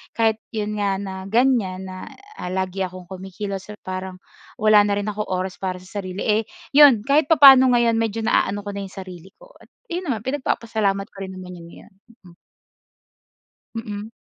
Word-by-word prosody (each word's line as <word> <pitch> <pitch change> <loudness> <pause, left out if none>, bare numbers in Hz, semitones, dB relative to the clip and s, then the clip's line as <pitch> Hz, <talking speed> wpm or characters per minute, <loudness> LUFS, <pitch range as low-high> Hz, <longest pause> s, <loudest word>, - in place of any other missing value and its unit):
kahit 225 -1 +2 0.2
'yon 210 0 -2
nga 200 -1 +1
na 195 -1 -6
ganyan 220 -5 +1
na, 185 0 -8 0.3
ah, - - -5
lagi 190 0 -3
akong 185 -1 -10
kumikilos 190 +1 -6
or - - -14
parang 185 0 -6 0.4
wala 215 -1 +6
na 205 - +1
rin 205 +1 -2
akong 210 0 -4
oras 185 0 -3
para 185 -1 -4
sa 195 +3 -7
sarili, 185 0 -6
eh, 215 +1 +2 0.3
'yon 280 -7 +8
kahit 280 +4 +3
papano 270 -5 +8
ngayon 235 -1 +3
medyo 225 0 -1
naaano 205 -1 +1
ko 205 - -6
na 200 0 -5
yung 190 - -17
sarili 185 -1 -10
ko. - - -18
At - - -19 0.2
yon 350 +1 -3
naman 245 - -2
pinagpapasalamat 220 -7 -1
ko - - -20
rin 190 - -9
naman 180 -1 -9
'yon 170 - -12
ngayon. - - -16 0.4
Mm. - - -21 1.4
Mm. 210 -1 -6
205 Hz, 180 wpm, -22 LUFS, 185-225 Hz, 1.4 s, yon